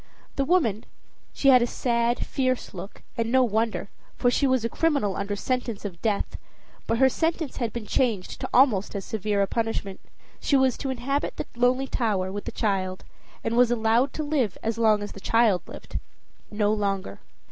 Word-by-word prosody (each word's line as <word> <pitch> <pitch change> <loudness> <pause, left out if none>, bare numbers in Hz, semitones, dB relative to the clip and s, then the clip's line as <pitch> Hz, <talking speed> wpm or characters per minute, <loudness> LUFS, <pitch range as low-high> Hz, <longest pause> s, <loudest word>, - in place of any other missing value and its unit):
The 275 - 0
woman 245 - +2 0.5
she 275 - +2
had 255 -2 +7
a 240 - +2
sad, 235 0 0
fierce 255 -2 -1
look, 190 +2 -9
and 230 0 -1
no 260 0 +5
wonder, 225 -2 -1 0.2
for 245 - +2
she 275 - +2
was 260 -3 +2
a - - +3
criminal 280 -9 +1
under 200 +1 -2
sentence 235 -1 -2
of 175 -4 -6
death, 210 -3 -1 0.5
but 230 - +1
her 265 +2 +6
sentence 320 +2 -1
had 235 -3 -1
been 235 -1 -5
changed 215 -4 -1
to - - -3
almost 220 -7 +3
as 195 - -4
severe 205 -1 0
a - - +2
punishment. 225 -3 -2 0.4
She 280 - +2
was 265 -2 +3
to 275 - -3
inhabit 265 +3 -2
the - - -3
lonely 250 +2 +2
tower 205 -8 -1
with 205 +1 -5
the - - -4
child, 190 -3 -1 0.4
and 225 +1 -1
was 245 0 +5
allowed 235 +3 +2
to 310 - -3
live 280 -10 0
as 225 0 -1
long 215 -2 +4
as 205 - -6
the - - -10
child 220 -3 +3
lived - - -7 0.5
no 210 0 +1
longer. 195 - -2
230 Hz, 190 wpm, -26 LUFS, 205-255 Hz, 0.5 s, had